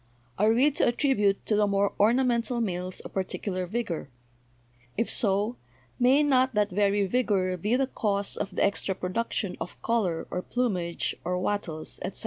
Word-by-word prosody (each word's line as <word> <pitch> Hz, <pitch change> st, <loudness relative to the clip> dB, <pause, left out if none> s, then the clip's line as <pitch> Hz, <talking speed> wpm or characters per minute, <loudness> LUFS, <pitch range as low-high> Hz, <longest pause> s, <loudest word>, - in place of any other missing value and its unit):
Are 210 Hz, +2 st, +4 dB
we 260 Hz, +6 st, +4 dB
to 290 Hz, -, +2 dB
at 240 Hz, -, 0 dB
tribute 210 Hz, -9 st, +2 dB
to 215 Hz, -, +2 dB
the 210 Hz, 0 st, +3 dB
more 200 Hz, 0 st, +1 dB
ornamental 240 Hz, +1 st, +2 dB
males 185 Hz, -4 st, -3 dB
a -, -, -6 dB
particular 185 Hz, -1 st, -3 dB
vigor? 190 Hz, -8 st, -3 dB, 0.9 s
If 230 Hz, -, 0 dB
so, 205 Hz, +3 st, +1 dB, 0.4 s
may 260 Hz, +4 st, +5 dB
not 260 Hz, -3 st, +3 dB
that 210 Hz, -1 st, +2 dB
very 200 Hz, +1 st, +2 dB
vigor 195 Hz, -5 st, +1 dB
be 210 Hz, +7 st, 0 dB
the 270 Hz, +1 st, +2 dB
cause 200 Hz, -6 st, -2 dB
of -, -, -4 dB
the -, -, +2 dB
extra 200 Hz, -1 st, 0 dB
production 200 Hz, +1 st, -2 dB
of -, -, -6 dB
color 190 Hz, -8 st, 0 dB
or 180 Hz, -, -2 dB
plumage 185 Hz, -8 st, -1 dB
or 180 Hz, +1 st, -1 dB
wattles, 180 Hz, -4 st, -3 dB
etc.? -, -, -4 dB
205 Hz, 165 wpm, -27 LUFS, 185-235 Hz, 0.9 s, may